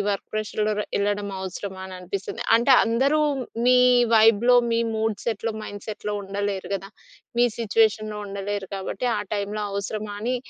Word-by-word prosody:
ఈ - - +1
వర్క్ 200 - -3
ప్రెషర్‌లో 215 0 -1
ర - - -2
వెళ్ళడం 205 0 0
అవసరమా! 190 +1 -6
అని 190 - -9
అనిపిస్తుంది. 195 +5 -5
అంటే, 240 +4 +4
అందరూ 270 +7 +2 0.5
మీ, 250 0 +6 0.4
వైబ్‌లో, 225 +2 +6 0.2
మీ 230 - +2 0.2
మూడ్ 220 -1 0
సెట్‌లో, 225 0 -1
మైండ్ 205 -1 -8
సెట్‌లో 210 -1 -4
ఉండలేరు 195 -1 -3
కదా! 195 +1 -5 0.5
మీ 245 - +6
సిట్యుయేషన్‌లో 215 -1 +1
ఉండలేరు. 200 0 -4
కాబట్టి, 195 +5 -4
ఆ - - -1
టైంలో 205 +1 -3
అవసరమా 205 +1 -4
అని, 250 +3 0
210 Hz, 155 wpm, -24 LUFS, 200-225 Hz, 0.5 s, మీ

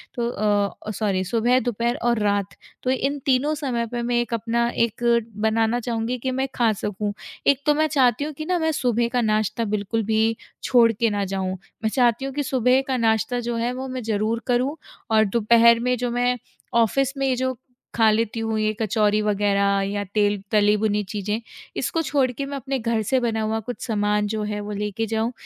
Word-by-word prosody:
तो 235 -2 -1
अ, 205 -3 +1 0.2
ओ - - -2
सॉरी! 200 -2 -1
सुबह 235 +6 +2
दोपहर 240 -1 -1
और 235 -2 +1
रात। 200 -1 0 0.3
तो 255 - -1
इन 275 +2 -1
तीनों 275 +3 +2
समय 240 -4 -1
पे, 240 -1 -2
मैं 240 +1 -1
एक 240 -1 -5
अपना 230 +1 0 0.2
एक 235 +1 -9 0.5
बनाना 225 +2 +2
चाहूँगी 235 0 -2
कि 260 +2 -2
मैं 265 +1 -1
खा 235 -2 +3
सकूँ। 205 0 -3 0.3
एक 280 -1 +4
तो 295 - +5
मैं 310 +1 +2
चाहती 265 -3 +2
हूँ 305 +1 -4
कि 310 +2 -6
ना, 360 +1 0
मैं 320 -1 +1
सुबह 240 -5 +1
का - - +3
नाश्ता 215 0 0
बिल्कुल 210 +1 -1
भी 220 +1 +2 0.3
छोड़ 235 -3 +5
के 230 +1 0
ना 205 -1 -1
जाऊँ। 195 +1 -4 0.5
मैं 220 - +2
चाहती 240 +1 +2
हूँ 270 - -4
कि 290 +1 -1
सुबह 260 -1 +2
का 260 - 0
नाश्ता 225 +1 +1
जो 240 0 -3
है, 230 +1 -1
वो 260 +1 -5
मैं 255 0 -4
ज़रूर 220 +1 -1
करूँ 255 +4 +1 0.4
और 220 -1 +5
दोपहर 235 +2 +5
में 250 +1 +1
जो 245 +1 -2
मैं 245 +1 +1 0.4
ऑफ़िस 250 +4 +2
में 275 - 0
ये 260 - +2
जो 260 +1 -1 0.4
खा 225 -2 +5
लेती 225 +1 0
हूँ, 225 -1 -1
ये 215 0 +1
कचोरी 210 0 +2
वग़ैरह, 200 -1 +2
या 205 0 -2
तेल 205 -2 +2
तली-भुनी 210 0 +2
चीज़ें, 210 +2 -3 0.4
इसको 330 - 0
छोड़ 275 -5 +1
के 275 +3 -4
मैं 280 0 -5
अपने 270 0 -3
घर 230 -1 0
से 260 - +4
बना 230 -2 -1
हुआ 220 +1 -1
कुछ 240 +3 -7
सामान 210 -2 +1
जो 215 0 -2
है, 210 0 -3
वो 205 0 -6
लेके 210 +2 -2
जाऊँ। 225 +1 -1
230 Hz, 205 wpm, -23 LUFS, 215-250 Hz, 0.5 s, तो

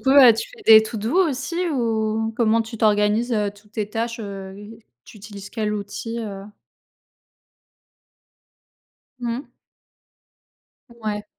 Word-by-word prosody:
coup, 265 - +1
heu, 270 -4 +9
tu 225 - -4
fais - - -15
des 220 -1 +9
to-do 220 - -2
aussi 335 +6 -2
ou 225 -4 0
comment 230 -1 +3
tu 225 0 -9
t'organises, 210 +3 +2
heu, 210 -2 +1
toutes 205 +1 -21
tes 210 -2 -3
tâches, 230 +1 -3
heu, 195 -2 -7 0.5
tu - - -14
utilises 200 -1 -10
quel 215 -2 -2
outil, 210 +3 -5
heu 200 -3 -6 2.8
Mmh. 240 +3 -3 1.4
Ouais. 215 -3 -5
220 Hz, 120 wpm, -22 LUFS, 210-235 Hz, 2.8 s, heu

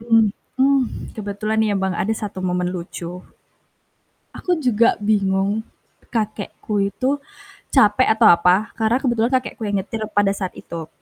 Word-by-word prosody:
Mhm, 225 -3 +3 0.2
mmm, 275 +1 +4 0.3
kebetulan 215 +1 -2
ya, 210 -2 +2
Bang, 190 -1 0
ada 210 +5 -1
satu 205 -3 -5
momen 180 -1 -1
lucu. 175 0 -6 1.2
Aku 355 -3 -1
juga 235 -3 +3
bingung 205 0 +1 0.5
kakekku 210 -2 -2
itu 270 +5 0 0.6
capek 220 -1 +4
atau 220 0 +6
apa, 180 +5 +4
karena 225 +1 +2
kebetulan 240 -2 +1
kakekku 255 -3 -1
yang 205 -1 -1
nyetir 220 +3 -5
pada 205 -1 +3
saat 190 -2 -3
itu. 165 -2 -7
210 Hz, 135 wpm, -21 LUFS, 190-225 Hz, 1.2 s, atau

